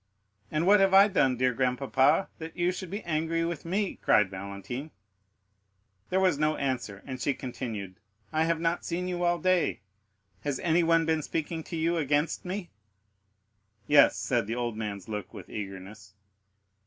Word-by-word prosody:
"And 155 +2 0
what 205 +2 +6
have 195 0 +4
I 200 +1 +9
done, 135 -11 +2
dear 125 0 +2
grandpapa, 135 +6 +2
that 165 0 -8
you 175 0 +2
should 185 -1 -6
be 205 +4 -5
angry 165 +1 0
with 170 -3 -4
me?" 195 +3 -1
cried 105 -3 +3
Valentine. 100 +9 -6 1.2
There 185 - +2
was 185 -6 +2
no 155 0 +2
answer, 120 -7 -3
and 130 -2 -6
she 140 - +1
continued: 110 -7 -6 0.3
"I 160 +1 +2
have 165 -1 +1
not 165 +1 0
seen 180 +2 -3
you 175 -1 -2
all 175 0 +2
day. 180 - +1 0.6
Has 145 -2 -2
anyone 165 -1 +3
been 160 -1 +1
speaking 160 +2 -3
to - - -6
you 165 +1 +1
against 150 +2 0
me?" 185 0 -5 1.1
"Yes," 145 +2 +6
said 120 -5 0
the 115 - -2
old 120 -2 -2
man's 100 -3 -5
look, 105 -3 -6
with - - -10
eagerness. 100 0 -8
155 Hz, 165 wpm, -28 LUFS, 120-170 Hz, 1.2 s, I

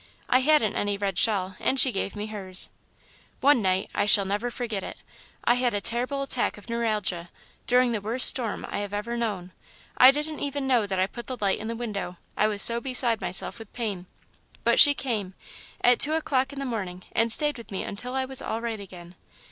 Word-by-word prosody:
I 255 - +4
hadn't 260 -6 +2
any 205 0 -1
red 195 -2 -2
shawl 190 -4 +1
and 265 - 0
she 260 - +4
gave 195 -1 -3
me 205 0 -4
hers. 195 -4 +1 0.7
"One 275 -2 +4
night 190 0 0
I 205 - 0
shall 200 -1 +6
never 205 +5 -2
forget 230 -5 -4
it - - -8 0.5
I 240 - +4
had 245 -2 0
a - - 0
terrible 250 +6 -1
attack 255 -5 -1
of 205 - -15
neuralgia, 210 -7 -2 0.4
during 250 0 +3
the 220 -3 -2
worst 230 +5 +4
storm 235 -5 +1
I - - -4
have 205 0 -4
ever 235 +3 -4
known. 205 -6 -3 0.4
I 255 - +8
didn't 300 +2 -1
even 285 -1 -3
know 245 -6 +2
that 190 -1 -3
I 185 - +2
put 240 +5 -9
the 255 - -5
light 195 -2 0
in 220 - -6
the 230 - -4
window 205 -6 -5 0.2
I 215 - +2
was 210 -1 -2
so 235 0 +4
beside 245 -4 0
myself 180 +3 -2
with 225 -2 -12
pain 205 -7 -4 0.6
but - - +3
she 290 -1 +9
came, 210 -9 -3 0.5
at 245 0 +5
two 305 - +4
o'clock 275 -4 0
in 280 - -10
the 275 - -4
morning, 190 -7 -5
and 230 0 +2
stayed 295 +2 +4
with 230 - -12
me 195 - -4
until 250 +5 -6
I 265 0 0
was 265 0 0
all 225 - -3
right 230 -2 -4
again. 180 -3 -11
225 Hz, 215 wpm, -26 LUFS, 200-255 Hz, 0.7 s, she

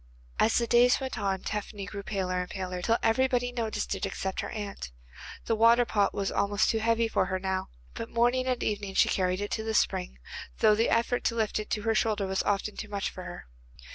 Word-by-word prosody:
As 225 - +4
the 235 - +2
days 245 +1 +5
went 260 -3 -4
on 195 -2 -1
Tephany 205 -1 -4
grew 200 0 -6
paler 185 -3 -2
and 180 - -6
paler, 185 -2 -4
till 225 +5 +2
everybody 245 +1 +2
noticed 230 -4 -2
it 195 - -5
except 190 -1 -3
her - - -3
aunt. 205 - -5 0.6
The 225 - +1
water 230 +2 +5
pot 205 -3 +1
was 195 -1 -2
almost 200 +1 +2
too 225 - 0
heavy 230 +1 +2
for 205 - +1
her 185 0 -1
now, 190 0 -2 0.2
but 230 - -6
morning 245 +2 +2
and 250 -2 0
evening 205 -2 -2
she - - +4
carried 185 0 0
it 205 - -4
to 220 - -2
the 220 0 -2
spring, 60 - 0 0.4
though 215 - +5
the 225 +2 +2
effort 235 +1 +1
to 230 - +1
lift 220 -2 0
it 215 - -6
to 210 - -2
her 225 0 +2
shoulder 215 -2 +1
was 190 0 0
often 205 +1 -1
too 215 - -6
much 200 -1 -2
for - - -8
her. - - -8
210 Hz, 225 wpm, -28 LUFS, 195-230 Hz, 0.6 s, days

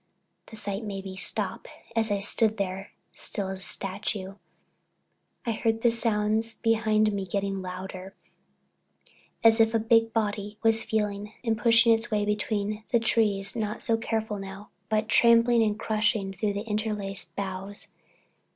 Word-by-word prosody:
The 220 - -11
sight 205 0 -4
made 195 -2 -5
me 190 -1 -6
stop - - -3 0.3
and, - - -32
as - - -5
I 205 - +1
stood 220 +2 +2
there 195 -1 -3 0.2
still 195 -2 -3
as 190 0 -5
a - - -12
statue, 195 0 -3 1.1
I 235 - +1
heard 225 0 0
the 235 - +5
sounds 220 0 0
behind 215 -1 +2
me 200 -1 -2
get 200 +2 -1
louder, 190 0 -5 1.3
as 225 0 +6
if 225 0 +3
a - - +4
big 225 0 +3
body 210 -1 -2
was 225 0 +3
feeling 210 -1 -2
and 225 -2 +1
pushing 230 0 +5
its 225 +1 0
way 210 -1 +1
between 210 0 -1
the 235 - +5
trees, 210 -3 +1
not 215 -2 -3
so 230 - +3
careful 220 -2 -2
now, 195 +1 -9 0.2
but 215 0 +1
trampling 235 0 +5
and 210 -1 +1
crushing 215 -3 0
through 205 +2 -1
the 200 +1 -3
interlaced 210 -2 -3
boughs. 195 +1 -4
210 Hz, 155 wpm, -27 LUFS, 200-225 Hz, 1.3 s, as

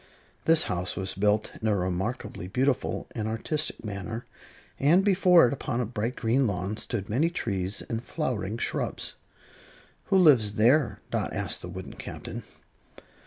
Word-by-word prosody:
This 160 -1 +6
house 90 -1 -2
was 95 -1 -1
built 105 +2 +1
in 110 - 0
a 105 - +3
remarkably 95 +1 -3
beautiful 130 +6 0
and 110 -2 -3
artistic 130 +6 -1
manner, 105 +3 -5 0.5
and 170 +8 +4
before 185 -4 +6
it, 120 - -1
upon 125 -3 -3
a 125 - +1
bright 115 +2 -3
green 120 +3 +2
lawn, 95 +1 -2
stood 105 -5 -3
many 140 +10 +2
trees 100 - -2
and 115 +1 -4
flowering 115 - -2
shrubs. - - -2 0.9
"Who 195 - +3
lives 130 - +6
there?" 125 +8 +3
Dot - - -1
asked - - -1
the 90 - -7
wooden 95 +1 -7
Captain. - - -7
110 Hz, 150 wpm, -27 LUFS, 100-140 Hz, 0.9 s, This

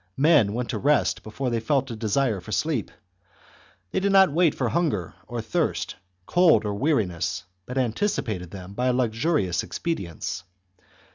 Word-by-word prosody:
Men 140 -8 +4
went 120 +1 -2
to - - -2
rest 145 -2 +2
before 125 +4 -4
they 115 - +1
felt 135 +3 0
a - - -4
desire 110 -1 0
for 100 - -10
sleep; 145 -3 0 1.0
they - - +1
did 200 +1 +1
not 190 -4 +6
wait 165 0 +3
for 125 -3 0
hunger 145 - 0
or - - -4
thirst, - - -1 0.3
cold, 175 -9 +4
or 105 - -1
weariness, 95 - 0 0.2
but 125 - -5
anticipated 120 - -1
them 90 0 -9
all - - -11
by 125 +4 0
luxurious 120 - +1
expedients. 90 - -4
125 Hz, 155 wpm, -25 LUFS, 100-150 Hz, 1.0 s, not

